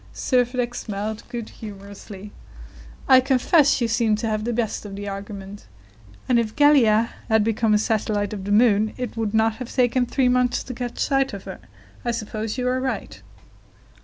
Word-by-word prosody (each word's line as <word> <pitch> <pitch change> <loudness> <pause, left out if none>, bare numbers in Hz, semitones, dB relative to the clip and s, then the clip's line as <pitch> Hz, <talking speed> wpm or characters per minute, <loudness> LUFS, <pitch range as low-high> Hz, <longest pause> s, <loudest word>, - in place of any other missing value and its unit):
Servadac 245 -1 0
smiled 215 -1 -4
good 235 -2 -5
humoredly. 200 -1 -10 0.8
"I 260 -1 +8
confess 270 +3 +3
you 235 - +1
seem 220 -1 +2
to 220 +2 -3
have 215 0 -2
the 240 - -1
best 230 -2 -2
of 200 -2 -8
the 205 +1 -6
argument, 200 - -8 0.6
and 245 -2 +3
if 220 -2 -2
Gallia 245 -7 +4 0.2
had 220 -1 +4
become 225 0 +2
a - - +5
satellite 210 -2 -1
of 195 -2 -6
the 205 - -3
moon, 215 -1 +3
it 250 -3 -5
would 220 -2 -2
not 220 0 +2
have 250 -2 -7
taken 250 -1 +2
three 260 +1 +1
months 250 0 +1
to 255 - -7
catch 245 0 -5
sight 270 -2 +1
of 195 -1 -7
her. - - -8 0.4
I 240 - -2
suppose 220 0 -3
you 250 -1 -1
are 255 +1 +1
right." 260 0 -4
225 Hz, 180 wpm, -23 LUFS, 210-250 Hz, 0.8 s, I